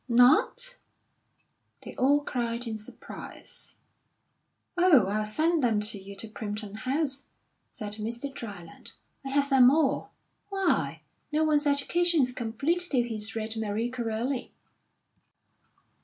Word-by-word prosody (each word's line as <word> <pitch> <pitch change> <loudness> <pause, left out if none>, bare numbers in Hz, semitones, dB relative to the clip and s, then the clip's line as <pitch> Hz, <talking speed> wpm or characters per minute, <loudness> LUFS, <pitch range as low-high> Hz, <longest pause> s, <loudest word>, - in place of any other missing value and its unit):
"Not?" 305 - +4 1.0
they - - -8
all 285 +3 +3
cried 240 -2 -2
in 220 -2 -4
surprise. 215 - -10 1.0
"Oh, 350 - +6
I'll 210 +2 0
send 315 +8 +2
them 230 -4 +2
to 210 0 0
you 195 +1 -10
to 225 - -7
Primpton 210 -1 -6
House," 275 +4 +1 0.4
said 210 -3 -5
Mr. 235 +6 -4
Dryland. 200 -10 -8 0.3
"I 270 - -5
have 280 +1 +1
them 255 -2 +8
all. 295 0 +1 0.4
Why, 390 -2 0 0.3
no 305 +1 +2
one's 300 -1 +3
education 325 +3 +2
is 250 0 -1
complete 250 +8 -1
till 250 -4 +2
he's 220 -2 -2
read 220 0 -2
Marie 220 +2 -1
Corelli." 240 +2 -2
245 Hz, 125 wpm, -28 LUFS, 220-290 Hz, 1.0 s, them